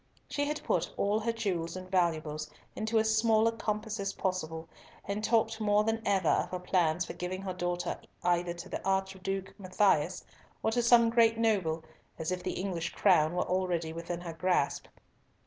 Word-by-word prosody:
She 285 - -1
had 300 +1 -3
put - - 0
all 205 +2 +2
her 230 +2 0
jewels 185 -7 -2
and 185 0 -7
valuables 155 -4 0 0.3
into 220 +1 0
as 220 0 +3
small 220 0 +4
a - - +3
compass 215 -1 -3
as 195 0 -2
possible, 165 -3 -3 0.4
and 200 +2 -2
talked 225 0 +2
more 210 0 +3
than 225 +1 0
ever 195 -4 +2
of - - +2
her 180 - -3
plans 180 -1 +1
for - - -6
giving 185 +2 -4
her 190 -1 -3
daughter 175 -1 -2 0.2
either 175 0 +1
to 170 +2 -8
the - - -5
Archduke 190 0 -2
Matthias, 185 -3 +2 0.4
or 220 - +2
to 240 +1 +2
some 235 -1 +5
great 230 -1 +4
noble, 190 -8 +1 0.3
as 160 +2 -3
if 180 0 -2
the - - -3
English 180 -3 -3
crown 175 -4 +4
were 180 - +1
already 175 -3 -1
within 170 +1 -5
her 170 -2 -6
grasp. 175 -3 0
190 Hz, 180 wpm, -31 LUFS, 175-220 Hz, 0.4 s, some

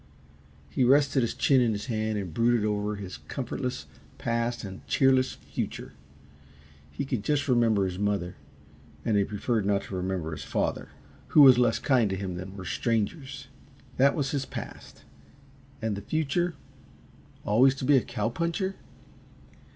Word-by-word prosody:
He 70 - 0
rested 135 +1 +4
his 115 - -1
chin 135 -2 +4
in 115 -3 +2
his 105 - -4
hand 110 -3 -1
and 95 -5 -5
brooded 115 +2 +2
over 105 0 -1
his 95 -3 -7
comfortless 125 -1 -4 0.3
past 115 0 -1
and 95 -2 -8
cheerless 130 -1 +3
future. - - -6 1.0
He 70 - -4
could 125 -6 -2
just 145 +2 0
remember 115 -6 +3
his 90 0 -4
mother 100 -4 -1 0.7
and 110 - +1
he 100 - +4
preferred 105 +2 -1
not 100 0 +1
to 95 - -7
remember 90 -3 -2
his 80 - -6
father, - - -2 0.4
who 150 - +7
was 130 -3 +8
less 120 -2 +3
kind 125 -6 +2
to 95 - -1
him 95 -1 -4
than 95 +2 -7
were 95 - -7
strangers. 130 - -2 0.5
That 140 +2 +4
was 140 -3 -1
his 140 -2 -2
past. - - -9 0.8
And 110 -2 0
the 100 - -6
future 160 - -1 0.9
always 125 +6 +4
to 135 - -5
be 145 +1 +5
a 130 - +5
cow 115 - -2
puncher? 170 - -2
115 Hz, 160 wpm, -27 LUFS, 100-135 Hz, 1.0 s, was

